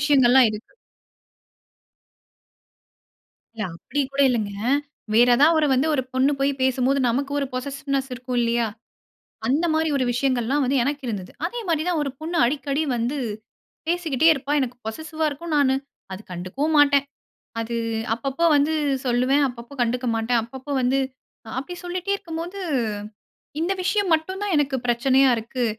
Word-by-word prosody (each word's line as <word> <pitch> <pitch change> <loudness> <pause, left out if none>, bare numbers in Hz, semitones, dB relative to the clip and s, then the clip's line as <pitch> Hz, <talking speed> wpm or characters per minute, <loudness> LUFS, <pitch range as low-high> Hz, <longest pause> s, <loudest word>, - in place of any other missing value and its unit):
விஷயங்கள்லாம் 265 -3 +5
இருக்கு. 215 +1 -9 2.8
இல்ல 220 - -3
அப்படி 285 +11 -5
கூட 280 +1 +1
இல்லைங்க. 215 -4 -1 0.6
வேற 240 +3 +6
ஏதாவது 315 +4 +5
ஒரு 300 - +2
வந்து 265 +5 +2
ஒரு 260 - +1
பொண்ணு 260 +2 +3
போய் 275 +1 +2
பேசும்போது 260 +1 +2
நமக்கு 275 +4 -1
ஒரு 275 - -1
பொசஸிவ்னெஸ் 275 +1 -3
இருக்கும் 250 0 -4
இல்லையா? 235 -1 +1 0.8
அந்த 295 +7 +2
மாதிரி 320 0 +1
ஒரு 260 - +1
விஷயங்கள்லாம் 255 +2 +1
வந்து 275 +2 +1
எனக்கு 285 +2 -2
இருந்தது. 195 -5 -4
அதே 475 +7 -3
மாதிரி 315 -2 +1
தான் 345 -3 +1
ஒரு 280 - -1
பொண்ணு 335 +2 -3
அடிக்கடி 280 +3 -1
வந்து 240 +5 -1 0.7
பேசிக்கிட்டே 330 -4 +1
இருப்பா. 280 0 -5
எனக்கு 250 -2 -2
பொசஸிவா 315 +7 -3
இருக்கும். 315 +3 -6
நானு 265 -2 +3 0.4
அத 190 - -5
கண்டுக்கவும் 220 - -2
மாட்டேன். 280 -1 +5 0.6
அது 235 +1 -3 0.4
அப்பப்போ 275 +6 -2
வந்து 290 +2 +2 0.3
சொல்லுவேன். 255 +4 +3
அப்பப்போ 240 +2 -10
கண்டுக்க 245 +1 -1
மாட்டேன். 230 +1 +1
அப்பப்போ 265 +4 -8
வந்து 255 +2 +2 0.6
அப்படி 280 +7 -5
சொல்லிட்டே 365 +2 -2
இருக்கும்போது, 340 +1 -6 1.0
இந்த 345 +4 +1
விஷயம் 400 0 +1
மட்டும் 375 +5 -2
தான் 405 -4 0
எனக்கு 285 -2 +1
பிரச்சனையா 260 +3 +4
இருக்கு. 240 +3 -3
275 Hz, 140 wpm, -23 LUFS, 245-305 Hz, 2.8 s, வேற